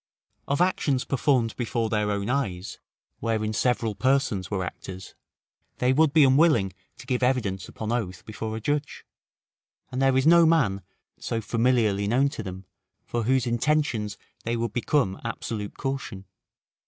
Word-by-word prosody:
Of 140 +4 0
actions 145 -7 +1
performed 130 -4 +1
before 115 -1 -1
their 105 -1 +1
own 100 0 -1
eyes, 105 -8 -2 0.4
wherein 110 -1 -1
several 115 -1 +1
persons 125 -7 +1
were 95 -3 -1
actors, 95 +1 -8 0.6
they 125 +1 +2
would 155 +1 +4
be 155 0 +6
unwilling 130 - +4 0.2
to - - -12
give 125 -1 -1
evidence 115 -8 0
upon 110 0 -5
oath 100 -7 -3
before 110 0 -5
a - - -4
judge; 145 +6 -2 0.9
and 130 +1 -2
there 135 -1 +4
is 130 - +2
no 170 0 +7
man, 120 -13 +2 0.4
so 115 - -2
familiarly 115 -3 +1
known 130 +6 +3
to 125 - -6
them, 95 -2 -7 0.4
for 120 -2 -2
whose 130 +1 +2
intentions 120 -3 0 0.3
they 115 +1 -1
would 115 -2 -2
become 120 -5 0
absolute 110 -3 -5
caution. 135 -8 -4
115 Hz, 150 wpm, -26 LUFS, 105-135 Hz, 0.9 s, no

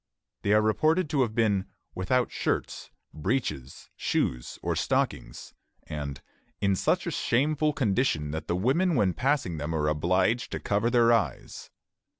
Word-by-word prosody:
They 100 - 0
are 105 0 +4
reported 155 - +2
to 140 - +2
have 115 -4 0
been 105 -5 +2 0.3
"without 125 +7 0
shirts, - - -2 0.2
breeches, 75 - -3
shoes, - - -1
or - - 0
stockings," - - -2 0.3
and 70 -2 -5 0.4
"in 100 -1 +2
such - - +1
a - - -2
shameful 150 +4 +1
condition 105 - 0
that 80 +1 -5
the 85 - 0
women 150 - +2
when 100 -7 +2
passing 125 - 0
them 75 +2 -3
are 75 -1 0
obliged 90 +10 +1
to - - -2
cover 105 +3 0
their 120 -1 +4
eyes." 100 - -2
105 Hz, 150 wpm, -27 LUFS, 80-130 Hz, 0.4 s, are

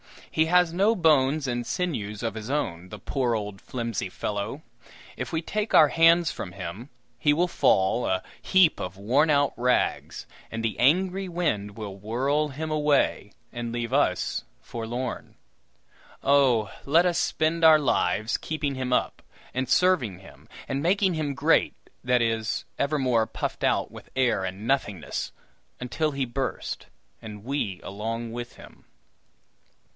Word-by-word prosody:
He 160 - +3
has 180 0 +4
no 200 +6 +3
bones 150 -4 +3
and 120 -2 -2
sinews 110 - -3
of 115 - -1
his 110 +1 -6
own, 90 - -2
the - - -8
poor 125 -4 -1
old 105 -2 -5
flimsy 115 -6 -4
fellow! 105 +10 -4 0.5
If - - -5
we 160 - 0
take 210 +5 -1
our 155 -2 +8
hands 165 +1 +5
from 90 - -7
him, 95 +7 -7 0.3
he 145 +2 +3
will 175 +4 +1
fall 95 - +2
a 95 0 0 0.2
heap 190 -4 +4
of 90 +1 -5
worn 130 +10 +2
out 145 -2 +3
rags, 125 +1 0 0.2
and 115 0 -5
the 115 - -2
angry 185 +8 +2
wind 110 - -2
will 100 -3 -6
whirl 130 +9 0
him 155 +3 -5
away, 150 -8 +1 0.2
and 120 -1 -5
leave 120 -1 -3
us - - +1 0.2
forlorn. 120 +2 -5 0.9
Oh, 130 -6 +3
let 165 +5 +4
us 175 -1 +1
spend 160 +1 0
our 160 -1 +9
lives 110 -5 +1
keeping 150 -3 -3
him 130 -1 -3
up, 125 - 0 0.3
and 130 0 -2
serving 165 - +2
him, 95 - -16 0.2
and 135 +1 -2
making 190 +3 +2
him 150 -3 -2
great - - +2 0.3
that 125 -1 +3
is, 115 0 -1
evermore 130 -6 +1
puffed 110 - -4
out - - +1
with - - -12
air 125 -7 +2
and 95 +3 -6
nothingness 105 - -1 0.5
until 150 +5 -1
he 140 -1 -1
burst, 125 +2 -4 0.3
and 105 -2 -9
we 120 -8 -3
along 115 +3 -4
with 120 +1 -6
him! - - -15
130 Hz, 150 wpm, -26 LUFS, 110-155 Hz, 0.9 s, our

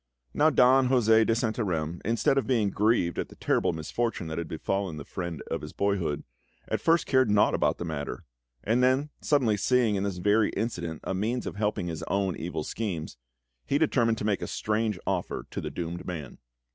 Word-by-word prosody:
Now 155 - +4
Don 130 -2 +5
José 115 -3 +5
de 115 - +3
Santarem, 95 -9 -1
instead 115 +5 +2
of 135 - 0
being 115 -6 +2
grieved 105 -5 +1
at - - -3
the - - -14
terrible 90 - +1
misfortune 85 +6 -2
that 80 - -3
had 85 - -4
befallen 90 +1 -2
the 70 - -7
friend 85 -4 -5
of - - -1
his - - -8
boyhood, 95 -7 -1 0.4
at - - -1
first 165 0 +3
cared 130 -4 +3
naught 105 0 +4
about - - +1
the 85 - -4
matter; 75 -3 -4 0.4
and 115 +4 +2
then, 130 +4 +2
suddenly 125 -8 +2
seeing 120 +1 +2
in 100 - 0
this 100 -2 -2
very 105 +4 +3
incident 85 -7 -3
a - - -2
means 110 +6 -1
of - - -5
helping 105 -2 -1
on - - -3
his 80 0 -5
own 100 -3 0
evil 85 -2 -4
schemes, 90 - -4 0.5
he 140 - +2
determined 120 -7 +2
to 105 - -4
make 105 -2 +1
a - - -3
strange 110 -1 -1
offer - - -2
to - - -4
the - - -4
doomed 85 0 -5
man. 80 -7 -6
105 Hz, 200 wpm, -28 LUFS, 85-120 Hz, 0.5 s, Don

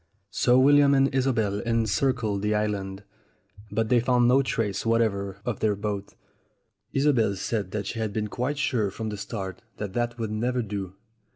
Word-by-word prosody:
So 125 0 +3
William 140 +1 +6
and 135 0 +3
Isobel 115 -7 +1
encircled 115 -1 0
the 105 +1 +1
island. 100 -2 -2 0.7
But 110 +1 -1
they 125 - +5
found 120 0 +3
no 130 +3 +5
trace 110 -6 -1
whatever 105 -4 0
of 120 -4 -2
their 105 -2 +1
boat. 100 -1 -4 0.8
Isobel 135 -8 +2
said 100 0 -3
she 115 - -4
had 110 -2 -1
been 105 0 -2
quite 130 +7 -2
sure 115 -7 +1
from 110 +3 -5
the 105 - -4
start 100 0 -6 0.2
that 100 -3 -5
that 120 0 -1
would 110 -2 -3
never 120 +3 -1
do. 100 -3 -5
110 Hz, 165 wpm, -26 LUFS, 100-125 Hz, 0.8 s, William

